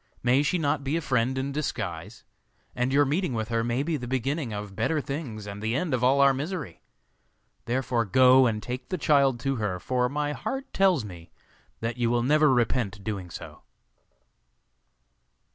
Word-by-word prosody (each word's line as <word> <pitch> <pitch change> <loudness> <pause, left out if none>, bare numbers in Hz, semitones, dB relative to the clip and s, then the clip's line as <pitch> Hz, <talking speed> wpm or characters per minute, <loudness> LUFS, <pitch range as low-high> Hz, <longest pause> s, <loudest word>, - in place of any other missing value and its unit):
May 125 +3 +4
she 150 +5 +1
not 145 -3 0
be 140 +4 0
a - - 0
friend 130 -2 0
in 135 +1 -2
disguise? 105 - -4 0.5
And 125 +1 0
your 145 +1 +4
meeting 150 -1 -1
with 110 0 -3
her 115 -1 0
may 120 +3 0
be 160 0 -1
the 125 -3 -7
beginning 130 +1 -2
of 105 -2 -6
better 150 +9 0
things 135 -7 -5
and 100 0 -7
the 110 +2 -1
end 155 +1 -1
of 125 -1 0
all 135 +2 +4
our 140 -1 +6
misery. 145 - -5 0.8
Therefore 120 -1 0
go 130 +5 +6
and 110 -2 -2
take 125 +1 -6
the 185 - -2
child 140 -5 +3
to 135 +1 -1
her, 100 -5 -2
for 125 +4 0
my 145 +1 -1
heart 270 - -5
tells 185 - +3
me 85 -4 -11 0.5
that 115 +1 -3
you 120 -1 +1
will 120 0 +1
never 150 +2 +4
repent 115 -5 0
doing 100 -5 -4
so. - - -10
130 Hz, 180 wpm, -26 LUFS, 115-145 Hz, 0.8 s, our